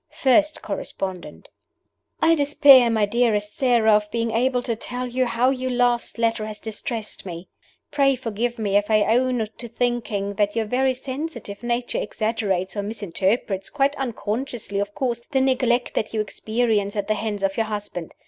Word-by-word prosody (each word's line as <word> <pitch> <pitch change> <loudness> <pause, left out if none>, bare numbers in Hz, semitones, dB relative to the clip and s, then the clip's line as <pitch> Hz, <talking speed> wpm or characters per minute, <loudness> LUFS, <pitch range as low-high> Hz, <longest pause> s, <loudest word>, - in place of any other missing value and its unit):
FIRST 305 +4 +3
CORRESPONDENT: 190 -2 -5 0.7
"I 325 +1 +6
despair, 285 -4 +6
my 220 -2 +2
dearest 210 -2 0
Sara, 240 -4 +3
of 210 0 +2
being 230 0 -1
able 245 +2 +1
to 230 - -1
tell 250 +3 -5
you 250 +1 0
how 240 +2 +2
your 255 -1 -2
last 245 -1 +1
letter 230 -2 0
has 215 -1 -6
distressed 220 0 -5
me. 175 -1 -8 0.4
Pray 275 -2 +3
forgive 240 -1 -3
me 205 -3 -1
if 205 +1 0
I 215 -1 +4
own 245 0 +2
to 235 - -6
thinking 230 -4 -2
that 205 +1 0
your 225 -1 0
very 255 +4 +1
sensitive 260 -5 -6
nature 240 0 -1
exaggerates 205 -4 -1
or 205 - -1
misinterprets, 200 -1 -2
quite 280 0 +1
unconsciously, 235 -4 -3
of 205 0 -3
course, 240 -3 -1
the 270 - +1
neglect 255 -2 +1
that 220 - -2
you - - 0
experience 215 -1 -1
at 205 -1 -2
the 215 - +2
hands 210 -2 -3
of 195 0 +1
your 225 -1 0
husband. 205 -5 -5
230 Hz, 165 wpm, -23 LUFS, 210-250 Hz, 0.7 s, I